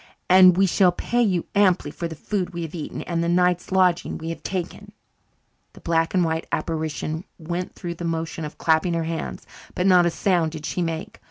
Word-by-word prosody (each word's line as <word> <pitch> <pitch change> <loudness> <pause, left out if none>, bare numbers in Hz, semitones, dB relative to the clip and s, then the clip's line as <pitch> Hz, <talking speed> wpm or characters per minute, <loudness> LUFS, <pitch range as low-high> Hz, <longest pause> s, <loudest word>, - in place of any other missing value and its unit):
And 185 -1 +7
we 195 - +5
shall 185 0 +4
pay 240 +7 -1
you 185 -7 +1
amply 185 -7 +3
for 170 - -4
the 160 - -8
food 180 +2 -3
we 170 - -3
have 160 - -7
eaten 160 -4 -5
and 170 -1 -2
the 170 - 0
night's 180 +1 +1
lodging 185 -2 +2
we 160 0 -6
have 165 - -6
taken." 195 +3 -5 0.8
The - - -14
black 165 +1 0
and 180 - +4
white 160 0 -2
apparition 160 0 -3
went 175 +2 -5
through 170 -1 -5
the 170 - -8
motion 165 0 -3
of 150 - -7
clapping 160 +2 +2
her 165 - 0
hands, 165 0 -5 0.3
but 180 - 0
not 180 -2 +6
a - - +3
sound 170 -2 0
did 155 -1 -7
she 180 - -2
make. 165 -1 -4
170 Hz, 205 wpm, -23 LUFS, 165-180 Hz, 0.8 s, And